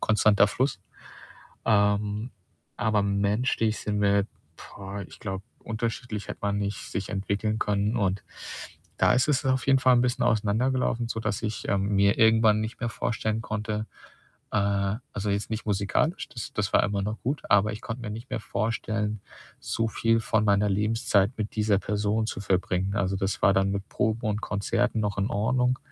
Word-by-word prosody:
konstanter 105 -1 +4
Fluss. 115 -1 -1 0.9
Ähm, 105 +2 +2 0.5
aber 105 0 +2
menschlich 105 +3 +1
sind 105 -1 -2
wir 100 0 +3 0.3
boah, 100 +1 -8
ich - - -14
glaube, 95 -4 -4 0.2
unterschiedlich 115 -1 -4
hätte - - -6
man 100 0 0
nicht 100 0 -2
sich 95 0 -3
entwickeln 100 +2 -1
können. 105 +2 0
Und 95 -3 0 0.8
da - - +5
ist 130 +4 +2
es 145 -1 +2
auf 130 0 +1
jeden 135 0 +5
Fall 130 -1 +5
'n 120 - +4
bisschen 125 0 +1
auseinandergelaufen, 115 +3 +1
sodass 110 -3 -2
ich, 110 -1 -3
ähm, 100 0 +1
mir 100 +1 +3
irgendwann 110 -1 +5
nicht 110 +2 -5
mehr 115 -1 -1
vorstellen 110 -1 -2
konnte, 110 0 -3 0.7
äh 100 -1 +1 0.2
also, 100 0 -2
jetzt 100 +1 -1
nicht 110 0 -3
musikalisch, 100 - 0
das 115 - -7
das 100 -2 -1
war - - +6
immer 100 -1 -1
noch 105 +3 -3
gut, 140 +5 -1
aber 105 +1 +4
ich 110 - -7
konnte 120 +1 -5
mir 110 - -5
nicht 115 +4 -7
mehr 125 -3 -2
vorstellen, 105 0 -2 0.4
so 115 0 -1
viel 115 +1 +2
von 110 -1 +1
meiner 105 0 +3
Lebenszeit 105 0 +2
mit 110 0 -4
dieser 105 -2 +3
Person 105 +2 0
zu 105 - -4
verbringen. 95 0 0
Also, 100 -1 0
das 95 0 -2
war 100 - +5
dann 95 0 +2
mit 100 0 -3
Proben 110 +2 -1
und 105 0 -1
Konzerten 105 +2 0
noch 105 -2 -1
in 100 +1 +1
Ordnung, 125 +4 +1
105 Hz, 175 wpm, -27 LUFS, 100-115 Hz, 0.9 s, war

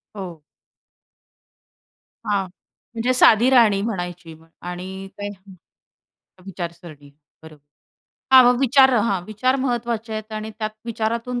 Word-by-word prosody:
हो. 180 -6 -8 1.9
हां. 200 -2 0 0.5
म्हणजे 240 +2 0
साधी 240 0 +5
राहणी 225 -6 +4
म्हणायची 175 -6 -5 0.3
आणि 185 +2 -7
काही 205 0 -5 1.1
विचारसरणी, 170 -5 -9 0.3
बरोबर. 155 -2 -15 0.7
हां, 250 -1 +7
विचार 265 0 +5
हां, 205 -5 +1
विचार 255 +6 0
महत्त्वाचे 235 -3 -2
आहेत 215 0 -6
आणि 215 0 -5
त्यात 215 -1 -2
विचारातून 230 +2 -3
215 Hz, 100 wpm, -21 LUFS, 180-235 Hz, 1.9 s, हां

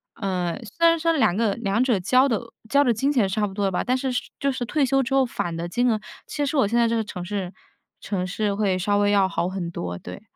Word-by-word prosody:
嗯， 180 -4 -2
虽 335 +9 +2
然 330 0 +3
说 330 +1 +2
两 220 - +2
个 215 -1 +1
两 225 0 0
者 240 -6 +2
交 255 +9 +4
的 230 -6 0 0.3
交 280 +3 +4
的 245 -4 +3
金 270 +6 0
钱 240 -9 +2
是 - - -4
差 210 -1 +1
不 195 - -9
多 200 0 -1
的 195 - +1
吧， 180 - -1
但 255 +1 +1
是 260 0 -2
是 250 - 0 0.2
就 280 - +1
是 255 -2 -3
退 285 +4 +1
休 270 +1 +2
之 265 +1 -3
后 270 -1 +4
返 175 -8 -3
的 170 +1 -4
金 245 +6 +1
额， 220 -2 +1 0.3
其 290 - -2
实 290 +2 -1
我 260 - +4
现 230 +4 0
在 235 -1 +4
这 230 - 0
个 225 - 0
城 180 -4 -7
市 190 0 -4 0.5
城 185 -3 -2
市 205 +2 -1
会 200 -2 +1
稍 205 +3 +1
微 205 0 +3
要 195 -2 +3
好 175 - -1
很 185 -2 -4
多， 90 - -4
对。 - - -9
215 Hz, 300 characters per minute, -24 LUFS, 190-260 Hz, 0.5 s, 交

